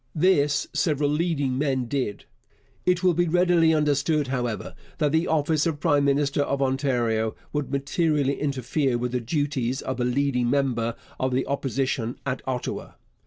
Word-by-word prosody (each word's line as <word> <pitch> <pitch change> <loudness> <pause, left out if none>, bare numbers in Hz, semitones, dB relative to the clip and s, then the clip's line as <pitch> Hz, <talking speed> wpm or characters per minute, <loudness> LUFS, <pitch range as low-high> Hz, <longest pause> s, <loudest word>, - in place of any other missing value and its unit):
This 150 -4 +3
several 145 -3 +1
leading 150 -5 0
men 135 -3 0
did. 120 -5 -3 0.6
It 180 0 +2
will 180 -1 +4
be 175 +1 +1
readily 175 -1 +4
understood, 150 -1 +1
however, 120 -6 -3 0.2
that 150 -1 +1
the 160 +2 +2
office 155 0 +1
of 155 -3 -2
prime 145 -3 +2
minister 140 0 +2
of 140 -1 -1
Ontario 125 -5 0 0.2
would 145 -3 -2
materially 140 0 0
interfere 135 -1 0
with 125 0 -2
the 125 -1 -1
duties 135 -1 -1
of 130 -1 -3
a - - +1
leading 125 -1 +1
member 120 -4 0 0.2
of 130 0 0
the 130 - +1
Opposition 130 -3 -2
at 130 -1 -2
Ottawa. 125 -2 -4
140 Hz, 155 wpm, -25 LUFS, 130-150 Hz, 0.6 s, will